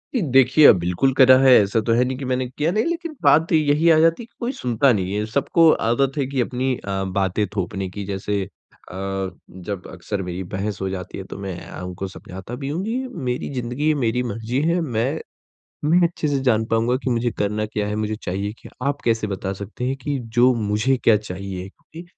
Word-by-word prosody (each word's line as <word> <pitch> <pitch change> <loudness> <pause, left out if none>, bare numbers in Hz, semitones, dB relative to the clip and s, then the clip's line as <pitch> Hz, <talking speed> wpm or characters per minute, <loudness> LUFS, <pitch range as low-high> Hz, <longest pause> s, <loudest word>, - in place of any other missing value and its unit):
जी, 245 - +2
देखिए 135 +3 +6
अ, - - +11
बिल्कुल 90 +9 0
करा 130 -1 +7
है 135 -1 +6
ऐसा 100 +3 +1
तो 115 - +4
है 120 +2 +4
नहीं 130 0 -3
कि 135 - -5
मैंने 130 0 0
किया 150 +6 -1
नहीं 215 +4 +1
लेकिन 335 -2 -3
बात 160 +2 +4
यही 155 +1 +3
आ 160 - +6
जाती 165 +7 +3
है - - -10
कि 235 - -31
कोई 240 +1 -2
सुनता 125 +2 +2
नहीं 95 -2 -2
है। 105 +1 -1
सबको 140 +8 +3 0.2
आदत 135 +4 +1
है 140 - +1
कि 135 -1 -1
अपनी 130 +1 -1
अ, 95 -1 -3
बातें 95 +2 0
थोपने 95 0 -3
की 100 +2 -6
जैसे 100 +1 -2
अ, - - -8 1.0
जब 95 0 -7
अक्सर 95 +2 -4
मेरी 90 +1 -5
बहस 100 0 -3
हो 95 - -1
जाती 95 -1 -6
है 95 - -5
तो - - -8
मैं 95 -3 -5
अ, - - -8
उनको 90 +1 -5
समझाता 95 +4 -9
भी 135 +2 -5
हूँ 165 +6 -2
कि 225 +3 -1 0.3
मेरी 125 0 -2
ज़िंदगी 125 +4 -2
है, - - +4
मेरी 125 +2 0
मर्जी 115 +3 -2
है 170 +3 +1
मैं, 130 +1 -1 0.7
मैं 165 +4 +4
अच्छे 165 -2 -3
से 140 -1 +1
जान 110 -2 +3
पाऊँगा 115 +2 +2
कि 130 - 0
मुझे 120 0 +1
करना 105 +1 -1
क्या 105 -1 -3
है, 105 - -2
मुझे 110 0 -2
चाहिए 100 0 -4
क्या? - - -13 0.2
आप 145 0 -2
कैसे 115 -2 +1
बता 95 -1 -3
सकते 100 +5 -6
हैं 130 +2 -1
कि 145 -2 -2 0.2
जो 125 +1 +6
मुझे 110 +4 +1
क्या 115 - +6
चाहिए 95 -2 -6 0.2
कि 165 +2 -9
115 Hz, 220 wpm, -22 LUFS, 100-135 Hz, 1.0 s, अ